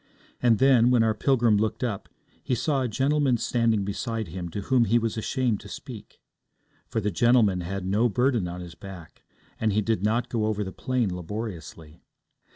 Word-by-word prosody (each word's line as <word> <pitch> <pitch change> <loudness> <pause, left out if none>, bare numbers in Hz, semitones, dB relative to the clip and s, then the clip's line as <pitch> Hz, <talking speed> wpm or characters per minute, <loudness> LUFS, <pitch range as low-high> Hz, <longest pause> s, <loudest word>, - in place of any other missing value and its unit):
And 120 -3 +4
then, 125 -2 +5
when 125 -2 +4
our 110 -1 +2
pilgrim 115 -1 +2
looked 110 +4 -1
up, 105 -6 -3 0.3
he 125 - 0
saw 140 +3 0
a 130 - 0
gentleman 135 +1 +1
standing 115 -3 +1
beside 110 0 -3
him 85 +1 -6
to 100 - -5
whom 125 +2 +2
he 115 +2 +3
was 115 -2 -1
ashamed 115 0 -1
to - - -12
speak. - - -10 0.7
For - - -1
the 105 -1 -1
gentleman 105 0 +3
had 95 +2 -4
no 105 +6 +2
burden 120 -3 +1
on 90 +1 -6
his 85 -1 -9
back, 85 -1 -11 0.4
and 110 -2 +1
he 110 - +2
did 110 -2 0
not 115 +4 +1
go 110 -3 -1
over 105 -1 -1
the 95 - -6
plain 120 -8 -1
laboriously. 85 -4 -7
110 Hz, 185 wpm, -26 LUFS, 95-120 Hz, 0.7 s, then